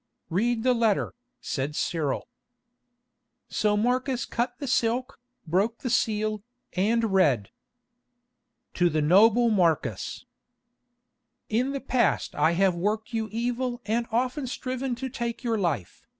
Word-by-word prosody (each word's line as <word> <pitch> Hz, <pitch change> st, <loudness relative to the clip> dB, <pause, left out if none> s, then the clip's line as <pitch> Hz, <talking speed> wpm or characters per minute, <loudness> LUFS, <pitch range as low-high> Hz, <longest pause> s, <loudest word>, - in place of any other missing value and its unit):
"Read 225 Hz, +6 st, +1 dB
the 255 Hz, 0 st, +4 dB
letter," 225 Hz, -4 st, +1 dB, 0.3 s
said 140 Hz, +2 st, -3 dB
Cyril. 155 Hz, -5 st, -1 dB, 1.2 s
So 210 Hz, -1 st, +1 dB
Marcus 250 Hz, +2 st, 0 dB
cut 245 Hz, +1 st, -2 dB
the 285 Hz, -, -5 dB
silk, 245 Hz, 0 st, 0 dB, 0.3 s
broke 195 Hz, +8 st, 0 dB
the 250 Hz, -, -2 dB
seal, 215 Hz, -2 st, +1 dB, 0.3 s
and 220 Hz, +2 st, +1 dB
read: 140 Hz, -, +3 dB, 1.2 s
"To 175 Hz, 0 st, +3 dB
the 155 Hz, -1 st, 0 dB
noble 225 Hz, +8 st, +5 dB
Marcus, 175 Hz, -6 st, 0 dB, 1.2 s
"In 245 Hz, +5 st, +1 dB
the 275 Hz, -, -2 dB
past 255 Hz, -4 st, +1 dB
I 165 Hz, -, +2 dB
have 190 Hz, +1 st, +3 dB
worked 215 Hz, +7 st, -2 dB
you 220 Hz, -1 st, -1 dB
evil 240 Hz, +2 st, -2 dB
and 230 Hz, +2 st, 0 dB
often 255 Hz, +4 st, 0 dB
striven 255 Hz, 0 st, -3 dB
to 265 Hz, +2 st, -4 dB
take 235 Hz, 0 st, -4 dB
your 230 Hz, -3 st, 0 dB
life. 145 Hz, -, -3 dB
225 Hz, 125 wpm, -26 LUFS, 190-245 Hz, 1.2 s, noble